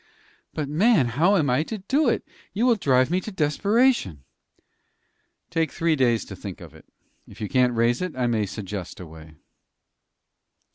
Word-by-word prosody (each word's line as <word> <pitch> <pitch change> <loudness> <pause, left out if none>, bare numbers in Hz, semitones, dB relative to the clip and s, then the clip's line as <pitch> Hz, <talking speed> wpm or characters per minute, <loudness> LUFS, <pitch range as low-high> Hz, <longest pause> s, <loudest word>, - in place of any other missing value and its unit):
"But, 150 -2 -2
man, 160 - +3
how 165 - +2
am 155 -7 +2
I 125 +4 +2
to 215 +7 -5
do 265 +8 +1
it? - - -2 0.3
You 220 +5 0
will 250 - +5
drive 130 -7 +2
me 185 +1 +1
to 215 - -7
desperation." 185 - +1 1.3
"Take 165 -1 0
three 165 -1 +1
days 120 -5 +1
to 95 - -9
think 95 0 -8
of 85 -5 -12
it. 80 -2 -17 0.4
If - - -15
you 105 - -3
can't 125 +1 +2
raise 115 +4 +1
it, 180 -5 -4
I 125 -1 -1
may 110 -4 0
suggest 95 -3 -7
a 90 - -8
way." 80 -1 -14
130 Hz, 175 wpm, -24 LUFS, -, 1.3 s, will